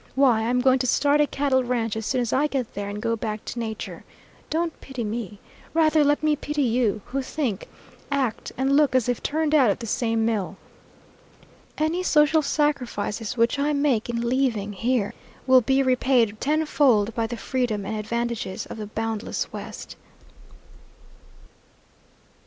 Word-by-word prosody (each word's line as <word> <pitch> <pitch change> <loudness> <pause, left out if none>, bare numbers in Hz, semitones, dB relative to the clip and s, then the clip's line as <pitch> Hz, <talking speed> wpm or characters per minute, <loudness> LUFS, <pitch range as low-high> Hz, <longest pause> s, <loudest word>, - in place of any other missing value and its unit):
Why, 260 -5 +4
I'm 250 +1 +2
going 260 0 +4
to 255 - 0
start 285 +4 +3
a 295 - +3
cattle 270 -2 +1
ranch 235 -3 -1
as 220 -1 -4
soon 255 - +1
as 235 - -2
I 290 +3 +3
get 265 -6 -3
there 200 0 -4
and 205 +1 -5
go 230 +2 0
back 215 -1 -5
to 245 - -5
nature. 220 -2 -5 0.5
Don't 330 0 -2
pity 260 -3 -5
me. 210 -2 -4 0.4
Rather 315 -1 +4
let 290 +1 +2
me 305 -1 +3
pity 295 0 -2
you, 225 -4 +1
who 270 +3 -3
think, 255 -7 -3 0.4
act, 270 -5 -1
and 270 +2 +2
look 290 -3 +3
as 255 -3 +3
if 245 -1 -1
turned 310 0 0
out 270 -7 +5
of 200 - +1
the 235 - -7
same 225 0 0
mill. 200 -4 -1 1.2
Any 315 +4 0
social 310 -2 +4
sacrifices 250 -7 -1
which 235 +4 +2
I 295 +1 +1
make 280 -6 +1
in 235 0 -1
leaving 235 -5 0
here 230 +1 0 0.3
will 260 -1 +6
be 265 +3 +2
repaid 250 -4 +2
tenfold 280 -7 +2
by 230 0 -1
the 240 +1 -5
freedom 220 -2 -2
and 215 +3 -3
advantages 230 -2 -3
of - - -8
the 210 -1 -6
boundless 220 0 -3
West." - - -8
245 Hz, 165 wpm, -24 LUFS, 225-280 Hz, 1.2 s, will